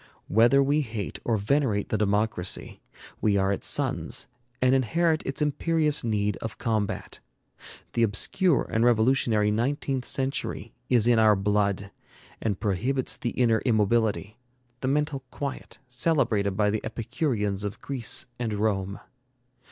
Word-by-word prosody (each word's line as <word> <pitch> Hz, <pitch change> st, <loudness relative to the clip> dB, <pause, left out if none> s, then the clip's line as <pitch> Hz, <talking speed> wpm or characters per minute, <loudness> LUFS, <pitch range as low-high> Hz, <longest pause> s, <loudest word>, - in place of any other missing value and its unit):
Whether 120 Hz, +6 st, +5 dB
we 145 Hz, +2 st, +2 dB
hate 110 Hz, -7 st, -5 dB
or 115 Hz, -2 st, +1 dB
venerate 105 Hz, -1 st, 0 dB
the 110 Hz, -, 0 dB
democracy, 105 Hz, -2 st, -1 dB, 0.4 s
we 105 Hz, -2 st, +2 dB
are 95 Hz, 0 st, +2 dB
its -, -, -4 dB
sons -, -, -1 dB, 0.3 s
and 130 Hz, 0 st, +3 dB
inherit 160 Hz, +6 st, +2 dB
its 135 Hz, +3 st, -1 dB
imperious 150 Hz, 0 st, +1 dB
need 105 Hz, -2 st, 0 dB
of 110 Hz, -3 st, -6 dB
combat. 110 Hz, -4 st, -2 dB, 0.7 s
The 115 Hz, -, 0 dB
obscure 130 Hz, -, +2 dB
and 110 Hz, 0 st, +2 dB
revolutionary 115 Hz, -2 st, +3 dB
nineteenth 130 Hz, +3 st, -1 dB
century 135 Hz, 0 st, -2 dB, 0.2 s
is 120 Hz, -4 st, +4 dB
in 120 Hz, -2 st, +4 dB
our 110 Hz, -1 st, +5 dB
blood, 100 Hz, 0 st, 0 dB, 0.5 s
and 105 Hz, -4 st, -1 dB
prohibits 120 Hz, +6 st, 0 dB
the 120 Hz, -, -3 dB
inner 115 Hz, -2 st, +2 dB
immobility, 110 Hz, -1 st, +1 dB, 0.4 s
the 130 Hz, -, -3 dB
mental 150 Hz, 0 st, 0 dB
quiet, 140 Hz, +1 st, -6 dB
celebrated 120 Hz, -, +1 dB
by 105 Hz, -1 st, +2 dB
the 110 Hz, -, -1 dB
Epicureans 105 Hz, -5 st, -2 dB
of 105 Hz, +1 st, -5 dB
Greece 130 Hz, -5 st, 0 dB
and 115 Hz, -3 st, -2 dB
Rome. 100 Hz, -2 st, -1 dB
115 Hz, 135 wpm, -26 LUFS, 105-135 Hz, 0.7 s, Whether